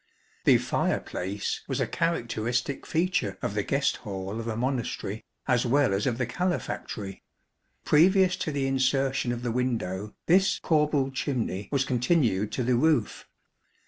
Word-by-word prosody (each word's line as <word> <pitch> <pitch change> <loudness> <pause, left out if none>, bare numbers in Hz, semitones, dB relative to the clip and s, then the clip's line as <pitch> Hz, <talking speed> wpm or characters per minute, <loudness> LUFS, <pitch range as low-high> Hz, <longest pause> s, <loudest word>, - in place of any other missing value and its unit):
The - - +7
fireplace 100 +3 -2
was - - -2
a - - +2
characteristic 125 -5 -1
feature 160 - 0
of - - -1
the 105 - 0
guest 140 +6 0
hall 100 0 -5
of 115 - -5
a 110 - -2
Monastery, 120 -4 -2 0.2
as 125 -3 +3
well 135 -2 +3
as 100 +5 0
of 120 -3 0
the 125 - 0
calefactory. 120 - -3 0.6
Previous 185 +4 +5
to 155 - -2
the 140 -2 -1
insertion 135 -1 +1
of 120 0 -4
the 120 - -1
window, 110 -5 -2
this 190 +2 +4
corbelled 150 -4 +1
chimney 115 -8 -2
was 135 -2 +1
continued 125 - +1
to 130 - -1
the 125 +1 +2
roof. 150 -4 +1
125 Hz, 145 wpm, -27 LUFS, 110-145 Hz, 0.6 s, The